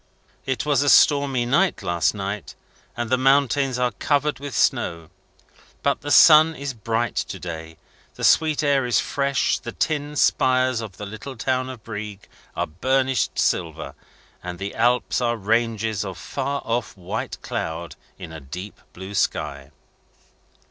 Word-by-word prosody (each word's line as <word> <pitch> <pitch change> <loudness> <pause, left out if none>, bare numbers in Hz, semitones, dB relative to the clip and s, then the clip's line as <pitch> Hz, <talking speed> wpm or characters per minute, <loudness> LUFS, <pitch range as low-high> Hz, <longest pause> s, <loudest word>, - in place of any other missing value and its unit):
It 130 -4 -1
was 145 -2 +2
a 145 - +2
stormy 140 -5 +4
night 160 +10 +1
last 85 -3 +1
night, 100 0 -5 0.4
and 120 0 -3
the 130 - +3
mountains 135 -1 +3
are 125 -1 +1
covered 145 +5 0
with 140 -2 -6
snow. 85 -1 0 0.7
But - - +1
the 145 - -5
sun 155 +1 +7
is 140 -1 -5
bright 115 +1 -2
to - - -2
day, 80 -2 -7 0.4
the - - -8
sweet 155 -1 +3
air 140 -3 +2
is 120 - +3
fresh, 140 -1 0
the 120 - -7
tin 150 +1 -2
spires 130 -3 +2
of 105 -4 -8
the 105 - -6
little 110 +6 -8
town 130 +2 -1
of 125 -4 -9
Brieg 105 -2 -7 0.3
are - - 0
burnished 130 - 0
silver, 80 -3 -1 0.5
and 90 0 -6
the 100 +2 -5
Alps 120 +2 +1
are 120 -1 0
ranges 110 0 0
of 95 -3 -6
far 140 +1 -3
off 115 -3 -2
white 90 - -5
cloud 80 +1 -4 0.2
in - - -9
a 80 - -8
deep 90 +8 -9
blue 95 +2 -8
sky. 70 -8 -2
120 Hz, 155 wpm, -23 LUFS, 100-135 Hz, 0.7 s, sun